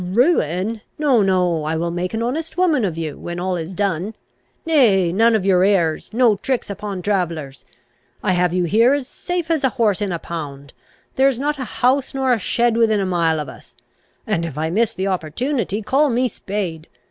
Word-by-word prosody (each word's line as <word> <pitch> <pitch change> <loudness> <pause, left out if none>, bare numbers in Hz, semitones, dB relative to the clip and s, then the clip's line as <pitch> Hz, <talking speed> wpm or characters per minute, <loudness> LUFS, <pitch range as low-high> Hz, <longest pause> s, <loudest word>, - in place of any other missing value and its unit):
"Ruin! 210 - +1 0.2
No, 275 -7 +3
no, 180 -4 +1
I 155 +1 -1
will 170 +1 -1
make 180 +4 -3
an 225 - -1
honest 320 +8 -3
woman 330 -9 +2
of 175 -5 -2
you, 155 -3 -4
when 175 0 -5
all 185 +1 -1
is 170 +2 -5
done. 200 +1 -1 0.5
Nay, 210 - +3
none 225 +3 +4
of 200 -3 0
your 185 -2 +4
airs; 175 -6 +1
no 230 -2 +3
tricks 250 0 -2
upon 200 -2 -5
travellers! 165 -9 -2 0.6
I 195 - +2
have 180 -1 +2
you 180 0 +1
here 230 - +4
as 275 -3 -4
safe 350 0 -4
AS 315 -4 +1
a 265 - +4
horse 220 -6 +1
in 200 -2 -1
a 170 - -1
pound; 145 -5 -7 0.4
there 265 +1 +5
is 270 -3 +1
not 295 +2 -2
a 260 - -3 0.2
house 265 +1 +2
nor 265 -1 +1
a 230 - 0
shed 235 +3 +1
within 220 -2 +3
a 195 - 0
mile 170 -3 +1
of 150 - -4
us; 130 - -13 0.5
and, 170 - -1
if 160 -4 -5
I 160 +1 -1
miss 220 +4 +2
the 190 - -2
opportunity, 200 - -2
call 280 +7 +2
me 250 +1 +1
spade. 190 -8 -5
200 Hz, 205 wpm, -20 LUFS, 175-245 Hz, 0.6 s, there